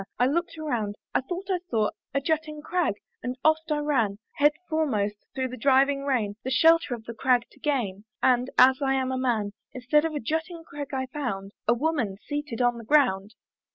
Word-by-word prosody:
I 245 Hz, -, +3 dB
looked 335 Hz, +4 st, -1 dB
around, 235 Hz, -10 st, -2 dB, 0.2 s
I -, -, +2 dB
thought 355 Hz, +8 st, -5 dB
I 365 Hz, -, +1 dB
saw 215 Hz, -3 st, +1 dB, 0.2 s
A 275 Hz, -, +1 dB
jutting 305 Hz, 0 st, -2 dB
crag, 350 Hz, -, 0 dB, 0.3 s
and 250 Hz, +1 st, -4 dB
oft' 315 Hz, 0 st, +3 dB
I 300 Hz, -, +2 dB
ran, 260 Hz, -9 st, +1 dB, 0.2 s
Head 295 Hz, +1 st, +5 dB
foremost, 215 Hz, -11 st, -1 dB
through 260 Hz, -1 st, -1 dB
the 255 Hz, -, -7 dB
driving 275 Hz, +2 st, +3 dB
rain, 220 Hz, -7 st, 0 dB
The 260 Hz, -, -3 dB
shelter 325 Hz, -1 st, +4 dB
of 225 Hz, -, -12 dB
the 230 Hz, -, -7 dB
crag 245 Hz, +1 st, +2 dB
to -, -, -21 dB
gain, 220 Hz, -9 st, -1 dB
And, 250 Hz, 0 st, +3 dB
as 260 Hz, +2 st, +6 dB
I 270 Hz, -1 st, +2 dB
am 260 Hz, -1 st, 0 dB
a 260 Hz, -, -1 dB
man, 225 Hz, -5 st, 0 dB, 0.2 s
Instead 265 Hz, +4 st, +2 dB
of 305 Hz, -5 st, -3 dB
jutting 325 Hz, +5 st, -3 dB
crag, 290 Hz, -2 st, -7 dB
I 260 Hz, -1 st, -1 dB
found 245 Hz, -8 st, -4 dB, 0.2 s
A 235 Hz, -, +4 dB
woman 245 Hz, -8 st, -1 dB
seated 290 Hz, -5 st, -2 dB
on 240 Hz, -1 st, +2 dB
the -, -, -9 dB
ground. 220 Hz, -6 st, +2 dB
265 Hz, 195 wpm, -26 LUFS, 235-300 Hz, 0.3 s, as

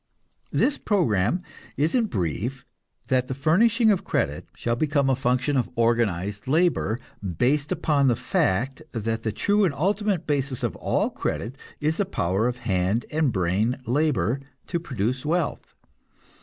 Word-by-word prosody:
This 290 Hz, -, +1 dB
program 160 Hz, -, +1 dB, 0.3 s
is 150 Hz, +3 st, +1 dB
in 245 Hz, -3 st, +3 dB
brief 105 Hz, -, -3 dB, 0.4 s
that 130 Hz, -1 st, +2 dB
the 130 Hz, -, -3 dB
furnishing 220 Hz, -, +4 dB
of 195 Hz, -, +1 dB
credit -, -, -1 dB
shall 120 Hz, 0 st, -1 dB
become 140 Hz, 0 st, +2 dB
a -, -, +3 dB
function 130 Hz, +3 st, +1 dB
of 125 Hz, -3 st, +1 dB
organized 105 Hz, -4 st, 0 dB
labor, 155 Hz, -6 st, +2 dB, 0.4 s
based 140 Hz, -, +1 dB
upon 140 Hz, -3 st, +2 dB
the 120 Hz, -, +4 dB
fact 125 Hz, +2 st, 0 dB
that 115 Hz, 0 st, -2 dB
the 110 Hz, -, -1 dB
true 205 Hz, -, +2 dB
and 165 Hz, -7 st, +1 dB
ultimate 195 Hz, +2 st, 0 dB
basis 140 Hz, -3 st, -1 dB
of 120 Hz, -, -1 dB
all -, -, 0 dB
credit 120 Hz, +5 st, -3 dB, 0.2 s
is 155 Hz, +2 st, 0 dB
the 205 Hz, -, +1 dB
power 100 Hz, -, 0 dB
of 125 Hz, 0 st, -2 dB
hand 95 Hz, +2 st, +1 dB
and 155 Hz, -3 st, +2 dB
brain 100 Hz, +6 st, +1 dB
labor 130 Hz, -, +1 dB, 0.3 s
to 170 Hz, -, -2 dB
produce 130 Hz, -, -2 dB
wealth. 165 Hz, +1 st, -2 dB
130 Hz, 150 wpm, -25 LUFS, 115-155 Hz, 0.4 s, furnishing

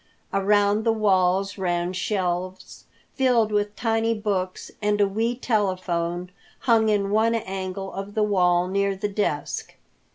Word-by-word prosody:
Around 205 Hz, +2 st, +3 dB
the 225 Hz, -, +3 dB
walls 195 Hz, -2 st, +1 dB
ran 175 Hz, -1 st, -1 dB
shelves 185 Hz, -1 st, -3 dB, 0.3 s
filled 245 Hz, -5 st, +2 dB
with 205 Hz, 0 st, 0 dB
tiny 225 Hz, 0 st, 0 dB
books, 195 Hz, -4 st, -3 dB
and 210 Hz, 0 st, +1 dB
a 205 Hz, -, +4 dB
wee 225 Hz, +5 st, -1 dB
telephone 180 Hz, -6 st, -1 dB, 0.3 s
hung 225 Hz, -3 st, +3 dB
in 200 Hz, -2 st, +1 dB
one 225 Hz, +2 st, +3 dB
angle 195 Hz, -2 st, -4 dB
of 195 Hz, +1 st, -6 dB
the 215 Hz, -, +2 dB
wall, 180 Hz, -4 st, +3 dB
near 200 Hz, +1 st, 0 dB
the 195 Hz, +2 st, -2 dB
desk. 195 Hz, -8 st, -2 dB
200 Hz, 135 wpm, -24 LUFS, 185-215 Hz, 0.3 s, a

